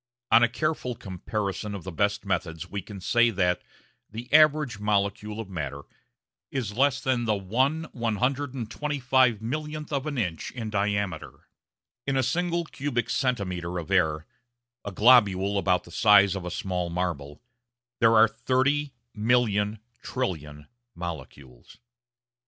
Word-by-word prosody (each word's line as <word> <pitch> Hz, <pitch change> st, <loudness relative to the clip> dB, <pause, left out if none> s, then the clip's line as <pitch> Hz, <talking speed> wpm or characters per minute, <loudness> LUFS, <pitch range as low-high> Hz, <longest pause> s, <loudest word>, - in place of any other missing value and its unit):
On 115 Hz, -, +7 dB
a 120 Hz, -, +4 dB
careful 140 Hz, -2 st, -2 dB
comparison 100 Hz, +2 st, -4 dB
of 95 Hz, -, -7 dB
the 95 Hz, -, -6 dB
best 105 Hz, +4 st, 0 dB
methods 90 Hz, -3 st, -2 dB
we 100 Hz, +3 st, -4 dB
can 100 Hz, +2 st, -10 dB
say 120 Hz, +5 st, +3 dB
that 90 Hz, -4 st, +1 dB, 0.5 s
the 115 Hz, +5 st, -8 dB
average 150 Hz, -7 st, +5 dB
molecule 105 Hz, +1 st, -1 dB
of 110 Hz, -, -5 dB
matter 70 Hz, -6 st, -5 dB, 0.7 s
is 120 Hz, -7 st, -3 dB
less 135 Hz, +2 st, +3 dB
than 125 Hz, -3 st, 0 dB
the 105 Hz, -2 st, +1 dB
1/125,000,000 130 Hz, -, -1 dB
of 140 Hz, 0 st, -2 dB
an 145 Hz, -3 st, -3 dB
inch 90 Hz, -9 st, -2 dB
in 115 Hz, -4 st, -5 dB
diameter. 100 Hz, -4 st, -2 dB, 0.6 s
In 135 Hz, -1 st, +1 dB
a 130 Hz, -, +2 dB
single 170 Hz, +5 st, 0 dB
cubic 135 Hz, -6 st, -3 dB
centimetre 90 Hz, -9 st, -1 dB
of 85 Hz, +2 st, -6 dB
air 80 Hz, -5 st, +2 dB, 0.6 s
a 100 Hz, -, -5 dB
globule 100 Hz, -3 st, +4 dB
about 90 Hz, -2 st, +1 dB
the 85 Hz, -, -15 dB
size 100 Hz, 0 st, +5 dB
of 95 Hz, -3 st, -5 dB
a -, -, -3 dB
small 90 Hz, -1 st, -3 dB
marble 85 Hz, -5 st, -4 dB, 0.6 s
there 115 Hz, 0 st, +5 dB
are 110 Hz, +1 st, +7 dB
thirty 130 Hz, +5 st, 0 dB, 0.2 s
million 105 Hz, -2 st, +1 dB, 0.2 s
trillion 75 Hz, -, -4 dB, 0.3 s
molecules. 70 Hz, -7 st, -9 dB
105 Hz, 130 wpm, -26 LUFS, 90-130 Hz, 0.7 s, On